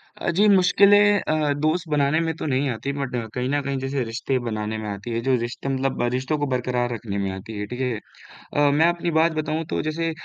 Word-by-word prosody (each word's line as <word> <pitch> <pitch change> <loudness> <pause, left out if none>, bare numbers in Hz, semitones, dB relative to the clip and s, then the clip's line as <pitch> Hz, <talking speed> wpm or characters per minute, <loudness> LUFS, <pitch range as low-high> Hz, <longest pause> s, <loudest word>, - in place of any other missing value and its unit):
अ, - - -3
जी 210 +2 +5
मुश्किलें 200 +2 +5
अ, 155 -2 0
दोस्त 165 +3 +1
बनाने 145 +1 +2
में 160 - 0
तो - - -5
नहीं 135 -1 0
आती 125 +3 -3
बट 140 -3 -3 0.2
कहीं 125 0 -2
न 145 +1 +1
कहीं 140 0 -2
जैसे 135 0 -2
रिश्ते 120 +3 -2
बनाने 110 0 -3
में 110 -1 -5
आती 100 +3 -6
है, 115 - -1
जो 130 +2 +2
रिश्ता 120 +3 -4
मतलब 135 -1 -1
रिश्तों 130 +4 -1
को 145 - -1
बरकरार 125 -1 -1
रखने 105 -3 -5
में 100 -1 -1
आती 95 +3 -7
है, 105 - -2
ठीक 125 +3 -7
है? 125 -4 -1 0.6
अ, 145 0 +4
मैं 165 - +6
अपनी 175 0 0
बात 165 +1 +4
बताऊँ 155 +1 -1
तो - - -1
जैसे 165 +2 -1
135 Hz, 230 wpm, -23 LUFS, 120-155 Hz, 0.6 s, मैं